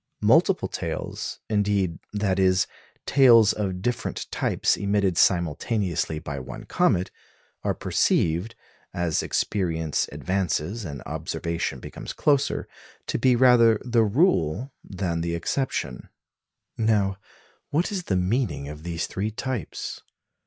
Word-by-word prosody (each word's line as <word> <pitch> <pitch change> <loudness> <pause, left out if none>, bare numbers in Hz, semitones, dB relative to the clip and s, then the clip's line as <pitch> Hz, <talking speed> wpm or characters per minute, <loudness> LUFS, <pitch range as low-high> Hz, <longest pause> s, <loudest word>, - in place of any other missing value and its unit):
Multiple - - +4
tails, - - -5
indeed 100 -5 0
that 100 -2 0
is, 95 0 +4 0.4
tails 115 -6 +6
of 95 -3 -3
different 120 +1 -2
types - - +1
emitted 100 -2 +1
simultaneously 85 0 +1
by 70 -2 -5
one 65 0 -8
comet 90 +2 +1 0.5
are - - -1
perceived, 85 +8 +1 0.4
as 85 -3 0
experience 80 -6 -1
advances 95 +2 -2
and 70 -5 -6
observation 85 0 -3
becomes - - -8
closer, 145 -1 +1 0.4
to - - -2
be 125 +1 +4
rather 115 -3 +6
the 120 -2 +3
rule 120 - +1
than 90 -4 -3
the 85 0 -1
exception. 85 - -2 0.7
Now 105 -3 +2 0.5
what 165 +8 0
is 185 -4 -3
the 95 - 0
meaning 90 - 0
of 75 +1 -8
these 85 0 -3
three 100 +3 -3
types? 125 - -5
95 Hz, 115 wpm, -25 LUFS, 85-115 Hz, 0.7 s, tails